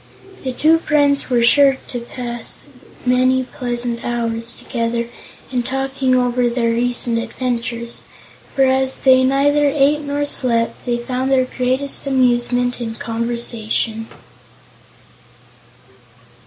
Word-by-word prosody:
The 260 - -2
two 315 +6 +3
friends 285 -4 +2
were 240 -2 +2
sure 275 +2 +5
to 245 - -4
pass 240 0 -5 0.4
many 255 +1 +3
pleasant 240 -2 -3
hours 230 -1 -2
together 235 -1 -3 0.4
in 250 -2 0
talking 270 +1 -1
over 245 -1 +2
their 235 -1 0
recent 240 0 0
adventures, 235 -1 -4 0.5
for 270 - +4
as 265 0 +2
they 260 -1 +5
neither 285 +2 +3
ate 285 +1 +3
nor 290 0 -2
slept 235 -4 -1
they 240 -1 +1
found 255 +2 -2
their 260 -1 +3
greatest 260 +3 -1
amusement 245 -1 +1
in 225 -1 -4
conversation. 230 -1 -2
250 Hz, 115 wpm, -19 LUFS, 235-265 Hz, 0.5 s, sure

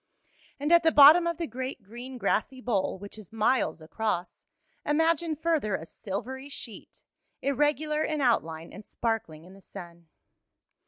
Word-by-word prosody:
And 295 +3 -1
at 340 0 +7
the 325 -1 +3
bottom 310 +4 +8
of 340 -2 -1
the 340 - -2
great, 255 -1 -6
green, 240 +5 -9
grassy 240 +4 -1
bowl, 215 -7 -1
which 200 +3 -10
is 205 - -13
miles 220 -8 +1
across, 180 0 -3 0.4
imagine 325 +1 +1
further 300 - 0
a 160 - -6
silvery 240 +10 -6
sheet, 235 -6 -9 0.4
irregular 295 +2 +1
in 310 -1 -1
outline 165 - 0
and 210 - -10
sparkling 215 -10 -3
in 185 - -14
the 195 - -16
sun. 170 -4 -11
245 Hz, 150 wpm, -28 LUFS, 195-295 Hz, 0.4 s, bottom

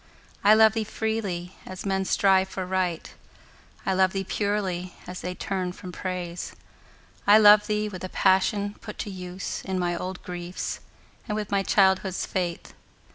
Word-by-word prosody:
I 210 +1 +7
love 220 0 +6
thee 225 -1 0
freely, 205 -5 -3
as 185 +1 -8
men 190 -1 0
strive 190 -1 +3
for 190 -1 -4
Right; 180 -3 -2 0.7
I 190 - +1
love 190 0 +3
thee 195 -1 -1
purely, 190 -3 -2
as 180 0 -7
they 180 0 -4
turn 185 -1 -3
from 180 0 -9
Praise. 180 -1 -5 0.7
I 205 +1 +9
love 210 -1 +7
thee 210 -1 0
with 185 -4 -7
the 185 - -5
passion 200 +2 +2
put 215 -2 -8
to 205 - -4
use 180 0 -5
In 190 -1 -2
my 175 -1 0
old 185 +2 -5
griefs, 175 0 -5 0.5
and 210 - -2
with 210 -1 -4
my 200 -1 +3
childhood's 190 -1 +2
faith. 175 -3 -3
190 Hz, 165 wpm, -26 LUFS, 180-205 Hz, 0.7 s, I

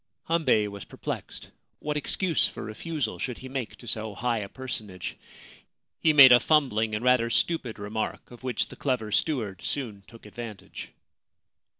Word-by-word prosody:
Hambei 135 -11 +3
was 100 -1 -7
perplexed. - - -6 0.3
What 150 +5 -3
excuse 165 +3 +2
for - - -7
refusal 125 +3 -3
should 125 -3 -3
he 130 - -9
make 130 -3 -4
to 120 - -14
so 110 -1 -2
high 120 -2 0
a 100 -2 -5
personage? 110 -8 -5 0.8
He 160 - +4
made 140 -4 +10
a 120 - +9
fumbling 115 -9 +2
and 110 +4 -3
rather 125 -2 +4
stupid 125 -2 0
remark, 110 +3 -4
of 120 - -12
which 125 -3 -1
the - - -10
clever 125 -6 -1
steward 110 - 0
soon 115 -8 -3
took 115 0 -15
advantage. 105 0 -8
120 Hz, 160 wpm, -27 LUFS, 110-135 Hz, 0.8 s, made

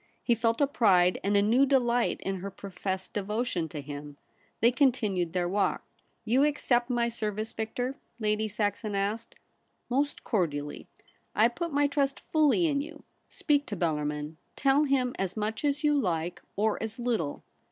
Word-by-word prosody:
He 240 - +3
felt 230 0 +1
a - - +6
pride 190 -10 +3
and 205 +1 +2
a 200 - +4
new 235 +6 +4
delight 245 -3 +2
in 195 0 -2
her 195 +2 -5
professed 190 -1 -5
devotion 205 -4 -1
to 150 0 -6
him. 145 0 -8 0.4
They 235 +2 +5
continued 220 - +1
their 180 -1 0
walk. 200 +3 0 0.2
* - - -43
You 250 +5 +3
accept 265 -4 +1
my 240 -1 +1
service, 215 -2 -3
Victor 245 +4 -3
?' 235 - -41
Lady 215 0 0
Saxon 205 0 -2
asked. 205 +4 -2 0.3
' - - -46
Most 285 +3 0
cordially. 150 - -2 0.5
I 220 +3 +5
put 335 +7 -4
my 290 0 +3
trust 280 -1 0
fully 310 +2 +3
in 285 -3 +1
you. 300 - -9 0.3
Speak 290 -2 +1
to 205 - -4
Bellarmin. 150 -2 -2 0.2
Tell 275 +2 +3
him 260 -3 +1
as 195 +1 -2
much 215 +4 -2
as 290 +1 0
you 295 -1 +4
like, 175 -6 -2
or 215 +1 0
as 220 -1 -4
little.' 230 - -2
220 Hz, 175 wpm, -29 LUFS, 190-260 Hz, 0.5 s, a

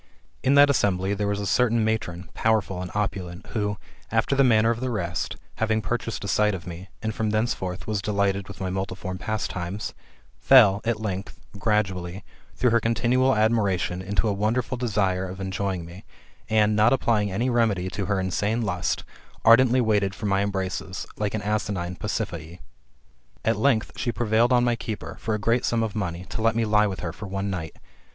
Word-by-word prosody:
In 135 +2 +3
that 145 0 +7
assembly 95 -6 +1
there 100 0 -1
was 100 0 -1
a 100 - -3
certain 115 +1 +2
matron, 90 -6 -2
powerful 105 -4 +1
and 90 - -5
opulent, 95 -3 -3
who, 105 -2 -1 0.3
after 115 +5 +2
the 135 - +5
manner 115 -2 +4
of 115 - -2
the 130 +1 -2
rest, 90 -6 -2 0.2
having 110 0 +1
purchased 115 -1 -3
a - - -4
sight 105 +1 +2
of 90 - -8
me, 90 +2 -8
and 110 0 -1
from 110 0 -1
thenceforth 105 -4 -1
was 105 -2 -1
delighted 100 -1 0
with 100 - -10
my 95 -1 -2
multiform 95 0 -4
pastimes, 105 -3 -3 0.5
fell, 105 -7 +6
at 115 -1 0
length, 100 -2 -4 0.2
gradually, 95 -3 -1 0.3
through 125 - +2
her 115 - +4
continual 120 +3 +2
admiration, 100 -5 +1
into 100 +4 0
a 105 - +1
wonderful 110 +5 0
desire 100 -6 0
of 95 +1 -8
enjoying 95 -2 -2
me, 85 +4 -11 0.5
and, 110 -1 +3
not 105 +3 +5
applying 110 -6 +1
any 115 +7 0
remedy 110 -6 +1
to 100 - -3
her 100 +1 0
insane 100 +5 0
lust, 90 -4 -1 0.4
ardently 125 +2 +6
waited 105 -4 +1
for 105 - -6
my 100 -1 +2
embraces, 95 -1 -3
like 105 0 -1
an 110 - -3
asinine 100 -4 -2
Pasiphae. 90 -5 -4 0.9
At 115 - +3
length 110 0 +2
she 120 - -1
prevailed 115 +1 +2
on 120 -1 +4
my 120 -1 +2
keeper, 110 -2 -6
for 110 -1 -1
a - - -3
great 115 +4 +1
sum 115 -1 +1
of 110 -2 -2
money, 90 -4 -3
to - - -4
let 115 0 +2
me 115 0 +1
lie 105 0 +4
with 95 -1 -5
her 80 -2 -4
for 105 - -8
one 100 +1 -3
night. 80 -4 -5
105 Hz, 190 wpm, -25 LUFS, 95-115 Hz, 0.9 s, that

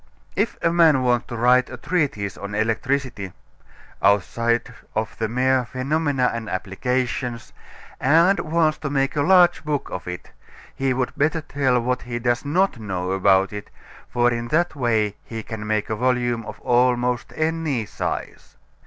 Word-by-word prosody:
If 210 +5 0
a 165 - +2
man 160 -6 +5
wants 120 -1 +1
to 120 - -6
write 125 +2 +4
a - - -7
treatise 140 - -1
on 100 +1 -6
electricity 115 -2 -1 0.7
outside 115 +5 +1 0.2
of 110 0 -2
the 110 - 0
mere 130 +2 +2
phenomena 135 +1 0
and 115 -2 -5
applications 120 +4 -2 0.5
and 165 +8 +4
wants 155 -1 +1
to 150 - -3
make 135 0 0
a 145 - +1
large 175 +1 +5
book 150 -2 -2
of 90 - -6
it, 90 0 -7 0.4
he 135 0 -1
would 130 0 -1
better 160 +3 +1
tell 135 -4 +1
what 125 +1 -1
he 120 -1 -5
does 120 +1 0
not 165 -1 +1
know 95 -4 -3
about 95 +1 +3
it, 105 0 -7 0.4
for 120 0 +2
in 120 0 -3
that 165 +5 +1
way 110 -6 0
he 115 -1 -7
can 110 -2 -6
make 110 -1 0
a - - 0
volume 120 -1 0
of - - -8
almost 125 -1 +1
any 155 -7 -1
size. - - -5
125 Hz, 160 wpm, -22 LUFS, 110-145 Hz, 0.7 s, man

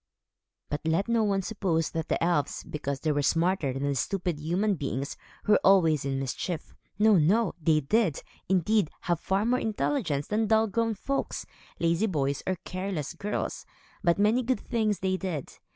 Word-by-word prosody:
But 145 - -2
let 165 +6 +1
no 230 -1 +2
one 195 -2 +1
suppose 180 -6 -1
that 160 -1 -3
the - - 0
elves, 170 -4 0
because 140 -2 -4
they 155 - +1
were 145 0 +1
smarter 165 0 +1
than 140 +2 -1
stupid 175 +2 -1
human 180 +7 +1
beings, 140 -3 -3 0.3
were 210 -1 +5
always 165 -7 +4
in 135 -1 -1
mischief. 150 +5 -4 0.2
No, 210 -1 +5
no! 190 +6 +3
They 155 0 +3
did, 175 +1 +1 0.3
indeed, 190 0 +2
have 175 -2 0
far 195 +4 0
more 250 +2 +2
intelligence 210 - -1
than 215 +1 0
dull 220 +1 +4
grown 225 +1 0
folks, 275 +7 -3 0.3
lazy 170 +5 +2
boys, 140 -6 -1
or 185 - +1
careless 185 -5 -3
girls; 205 +4 -3 0.4
but 170 -2 +3
many 215 +5 +3
good 255 +1 -1
things 215 -3 0
they 185 0 +1
did. 175 -8 -5
185 Hz, 170 wpm, -28 LUFS, 155-210 Hz, 0.4 s, were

